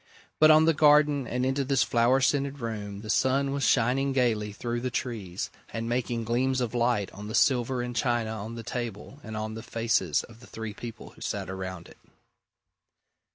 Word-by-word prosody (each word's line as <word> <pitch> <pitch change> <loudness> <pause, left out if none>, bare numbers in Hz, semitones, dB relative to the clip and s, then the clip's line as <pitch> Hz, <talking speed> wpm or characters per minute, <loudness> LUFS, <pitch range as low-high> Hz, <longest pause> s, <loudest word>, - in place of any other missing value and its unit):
But 155 - +7
on 155 0 +7
the 165 - +4
garden 150 -3 +4
and 125 +2 -1
into 135 +1 0
this 135 -3 +2
flower 120 +3 +3
scented 140 +1 +1
room 105 -5 -5
the 110 - -9
sun 135 +3 +2
was 140 0 -2
shining 135 +3 +2
gaily 110 -5 +1
through 120 +3 -3
the 130 - -1
trees, 110 -8 -4 0.2
and 115 0 -4
making 120 -1 -1
gleams 130 +3 +1
of 125 -2 -2
light 120 -5 +1
on 105 +1 -9
the 110 - -4
silver 125 -1 +2
and 120 0 -5
china 120 -3 0
on 110 +1 -6
the 115 - -7
table 120 +3 -5
and 110 -1 -6
on 110 0 -3
the 110 - -6
faces 115 -9 0
of 115 -1 -14
the 125 - -15
three 110 -1 -6
people 115 +1 -9
who - - -19
sat 95 - -3
around 95 -2 -6
it. - - -17
120 Hz, 195 wpm, -27 LUFS, 110-130 Hz, 0.2 s, But